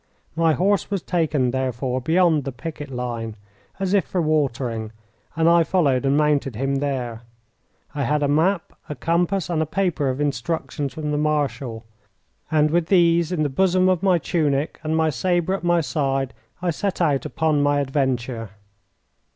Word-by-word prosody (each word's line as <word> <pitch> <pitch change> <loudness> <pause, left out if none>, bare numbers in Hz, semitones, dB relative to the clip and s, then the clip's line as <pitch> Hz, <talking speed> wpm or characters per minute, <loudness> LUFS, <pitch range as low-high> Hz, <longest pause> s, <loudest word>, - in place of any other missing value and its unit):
My 165 -1 +3
horse 195 +3 +1
was 200 -4 -2
taken, 155 -8 +1
therefore, 130 0 -2
beyond 160 +1 +3
the 135 - -4
picket 145 +2 -7
line, 120 -3 -4 0.4
as 195 0 -1
if 200 - +4
for 185 - -3
watering, 130 -8 -1 0.4
and 165 0 +2
I 170 0 +6
followed 140 -7 +1
and 140 +1 +3
mounted 145 -4 +1
him 135 +4 -1
there. 130 -5 -3 0.7
I 140 -2 -1
had 150 +2 +1
a - - +2
map, 165 +6 +1 0.2
a 150 - -4
compass, 170 +5 0
and 170 -3 0
a 160 - -1
paper 165 -6 0
of 130 +1 -3
instructions 145 -1 -2
from 150 -1 -3
the 150 - 0
Marshal, 135 -6 -1 0.6
and 155 -1 +3
with 170 0 +1
these 170 -3 +3
in 165 -4 0
the - - +2
bosom 185 +5 +2
of 185 -3 +1
my 190 -3 +4
tunic 150 -3 -1
and 160 0 -1
my 160 -1 +2
sabre 175 +7 0
at 195 - -3
my 175 -1 +3
side 135 -2 -1 0.3
I 175 - +1
set 195 +5 -3
out 150 -6 +1
upon 155 -2 +1
my 145 0 +2
adventure. 130 -5 -1
150 Hz, 170 wpm, -22 LUFS, 135-170 Hz, 0.7 s, I